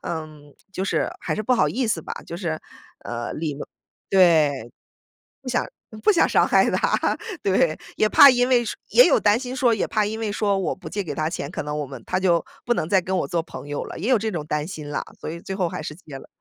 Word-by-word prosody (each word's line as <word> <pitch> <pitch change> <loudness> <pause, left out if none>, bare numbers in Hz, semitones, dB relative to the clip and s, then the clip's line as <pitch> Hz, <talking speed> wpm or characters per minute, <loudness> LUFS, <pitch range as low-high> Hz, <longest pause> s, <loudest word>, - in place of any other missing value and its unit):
呃， 160 -2 -4 0.5
就 185 - -3
是 195 - 0
还 - - -2
是 215 - -3
不 255 - +1
好 250 - +3
意 255 -1 -1
思 190 -6 0
吧， - - -7
就 - - -7
是， 165 -4 -3 0.5
呃， 120 0 -4
礼 155 -2 -3
貌 145 - -7 0.4
对， 155 -10 +4 1.2
不 220 - -11
想 - - -11
不 425 - +6
想 335 - +3
伤 - - +3
害 - - +4
他， - - +1 0.2
对。 185 -5 +2 0.2
也 215 - +3
怕 280 +5 +9
因 245 0 +2
为 245 -2 +3
说 220 - -4
也 - - +7
有 315 - +4
担 210 +1 +3
心 255 0 -5
说 250 -4 +3
也 210 - -1
怕 210 -1 0
因 220 +1 -4
为 220 -2 -2
说 200 -1 0
我 190 - -1
不 - - -9
借 205 - -3
给 160 -6 -5
他 155 +1 -1
钱， 145 -4 -5
可 170 - -4
能 150 0 -3
我 150 - -2
们 135 -2 -9
他 185 - 0
就 175 -3 +3 0.2
不 240 - +1
能 155 - -2
再 190 0 +4
跟 185 +1 -2
我 - - -1
做 165 +3 -1
朋 155 - -10
友 145 - -3
了， - - -8
也 200 - -3
有 255 - +5
这 220 +1 -2
种 155 -5 -4
担 150 -1 -1
心 155 -5 -7
啦， 145 - -2 0.2
所 - - -6
以 170 +2 -6
最 190 +2 -6
后 180 -4 0
还 - - -6
是 - - -5
借 155 -6 -11
了。 - - -12
185 Hz, 275 characters per minute, -23 LUFS, 155-215 Hz, 1.2 s, 怕